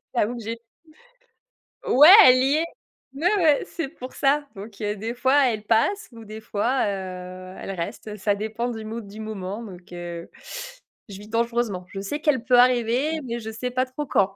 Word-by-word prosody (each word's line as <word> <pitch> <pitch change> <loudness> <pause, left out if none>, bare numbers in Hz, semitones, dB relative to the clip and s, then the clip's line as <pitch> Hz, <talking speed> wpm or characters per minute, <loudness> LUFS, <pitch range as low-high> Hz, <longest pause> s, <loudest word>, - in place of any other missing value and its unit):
j'avoue 235 +1 +1
que - - -7
j'ai 225 +2 -4 1.3
ouais, 295 +6 +8 0.2
elle 255 0 +8
y 275 +2 +3
est, 325 - +1 0.5
ouais, 355 +8 +2
ouais, 310 -5 +3
c'est 325 -5 -4
pour 255 -4 -10
ça. 290 +1 +2
Donc 205 +2 -10
heu, 210 0 -1
des 220 +3 -4
fois, 265 +3 +3
elle 215 -3 -3
passe 235 - +1
ou 230 -1 -12
des 215 +1 -9
fois, 230 +5 0
heu, 185 -2 -6
elle - - -6
reste, 205 +4 -6
ça 205 +1 +1
dépend 220 +4 -3
du 225 -2 -6
mood 220 -1 -6
du 205 +2 -11
moment 215 0 -5
donc 185 -4 -12
heu, 175 -1 -7 0.8
je 195 - -8
vis 210 +1 -12
dangereusement. 230 -5 -1
Je 195 0 -6
sais 245 +10 -4
qu'elle 275 -7 +1
peut 250 -1 +4
arriver 250 +5 +3
mais 235 -1 -4
je 220 -1 -6
sais 250 +3 -4
pas 255 +1 +1
trop 260 +3 -5
quand. 195 -3 +1
225 Hz, 190 wpm, -24 LUFS, 200-255 Hz, 1.3 s, ouais